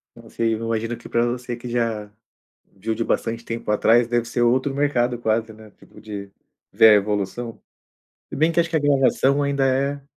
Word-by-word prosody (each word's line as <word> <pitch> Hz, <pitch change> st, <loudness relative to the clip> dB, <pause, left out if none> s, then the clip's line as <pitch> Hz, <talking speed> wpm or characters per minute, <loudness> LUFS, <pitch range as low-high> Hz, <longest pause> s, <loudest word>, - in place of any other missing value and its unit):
Não -, -, -15 dB
sei, 115 Hz, -1 st, 0 dB
eu -, -, -6 dB
imagino 115 Hz, +1 st, -2 dB
que -, -, -12 dB
pra 120 Hz, 0 st, +1 dB
você 120 Hz, 0 st, -3 dB
que 120 Hz, +1 st, -9 dB
já 115 Hz, -3 st, -2 dB, 0.6 s
viu 110 Hz, +3 st, -3 dB
de 115 Hz, -, -1 dB
bastante 115 Hz, +1 st, -2 dB
tempo 115 Hz, -2 st, -4 dB
atrás, 115 Hz, +3 st, +4 dB
deve 120 Hz, -1 st, 0 dB
ser 120 Hz, +1 st, -2 dB
outro 130 Hz, +3 st, +2 dB
mercado 125 Hz, -4 st, 0 dB
quase, 110 Hz, 0 st, -1 dB
né, 110 Hz, -1 st, -15 dB
tipo, -, -, -18 dB
de 100 Hz, -2 st, -8 dB, 0.4 s
ver 110 Hz, -, +7 dB
a -, -, +8 dB
evolução. 105 Hz, +3 st, -2 dB, 0.7 s
Se -, -, -7 dB
bem 160 Hz, +3 st, +2 dB
que 170 Hz, -, 0 dB
acho 170 Hz, 0 st, +1 dB
que 165 Hz, -, -2 dB
a -, -, +3 dB
gravação 140 Hz, -1 st, +2 dB
ainda 140 Hz, -1 st, 0 dB
é 140 Hz, +2 st, 0 dB
120 Hz, 200 wpm, -22 LUFS, 110-135 Hz, 0.7 s, a